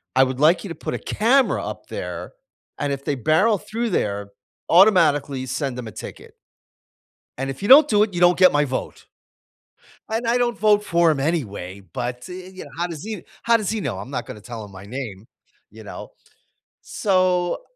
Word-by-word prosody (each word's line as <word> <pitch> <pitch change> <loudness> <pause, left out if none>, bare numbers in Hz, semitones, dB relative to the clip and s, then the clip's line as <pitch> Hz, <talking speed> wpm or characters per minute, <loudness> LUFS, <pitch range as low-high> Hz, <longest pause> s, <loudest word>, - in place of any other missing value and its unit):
I 130 - +6
would 130 -1 -2
like 160 +4 +4
you - - -6
to 165 - -6
put - - -5
a - - -3
camera 250 +5 +2
up - - -7
there, - - -6 0.5
and 145 -1 -1
if 140 0 -6
they 145 - 0
barrel 160 - +3
through 230 +5 -3
there, 100 - -1 0.4
automatically 150 -8 +4
send 130 0 -3
them 120 -3 -6
a - - -8
ticket." - - -10 1.0
"And 135 +1 -3
if 135 - -6
you 200 - -2
don't 290 +4 +9
do 210 -1 +4
it, 210 - -3
you 175 - -2
don't 175 0 +5
get 185 -1 +7
my 145 0 +2
vote." 130 -1 -5 1.0
And 225 +1 -2
I 235 +2 +3
don't 240 -1 0
vote 210 -1 +3
for 170 -4 +3
him 150 - -2
anyway, 100 - -3
but, 120 +7 -6
eh, 180 0 -8
you 185 - -9
how 175 +1 -1
does 160 -3 -8
he 215 -3 -6 0.2
how 235 0 +4
does 215 -4 -3
he 220 -1 -2
know? 120 - -3
I'm 100 +7 -8
not 125 -3 -3
gonna 105 - -9
tell 115 0 -8
him 100 - -14
my 95 +1 -11
name, 110 -3 -7 0.4
you 110 0 -12
know? 100 - -9 0.7
So, 185 - 0
160 Hz, 200 wpm, -22 LUFS, 125-205 Hz, 1.0 s, don't